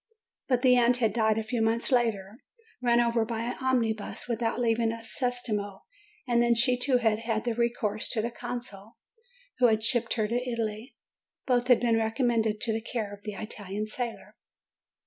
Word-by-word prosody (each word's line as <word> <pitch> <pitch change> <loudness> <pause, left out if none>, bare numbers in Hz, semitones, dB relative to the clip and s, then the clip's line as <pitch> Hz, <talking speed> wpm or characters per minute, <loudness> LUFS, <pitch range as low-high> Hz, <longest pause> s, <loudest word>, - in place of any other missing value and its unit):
But 250 -2 +1
the 250 -1 +6
aunt 245 0 +4
had 225 -4 +1
died 220 -1 +2
a 220 - -1
few 225 +1 -2
months 225 +4 0
later, 225 -3 0 0.4
run 240 -1 +3
over 235 -1 +2
by 225 0 -3
an 240 +1 -4
omnibus, 230 -6 -1
without 230 0 -1
leaving 230 -1 +1
a 230 0 -7
centesimo; 225 -5 -3 0.5
and 240 -1 +3
then 240 0 +3
she 250 +2 +4
too 250 +1 +2
had 220 -3 +1
had 225 -1 -2
recourse 235 -3 -1
to 220 - 0
the 235 - -2
consul, 230 -4 -7 0.6
who 250 - +6
had 220 -1 +1
shipped 235 0 +2
her 215 -2 0
to 230 - -4 0.2
Italy. 225 +1 -4 0.5
Both 245 -1 +1
had 245 -3 +5
been 230 -2 +2
recommended 225 -1 0
to 230 -2 +1
the 225 - -2
care 220 -3 -4
of 205 - -11
the 210 0 -6
Italian 210 0 -5
sailor. 235 +2 -6
230 Hz, 180 wpm, -28 LUFS, 220-245 Hz, 0.6 s, the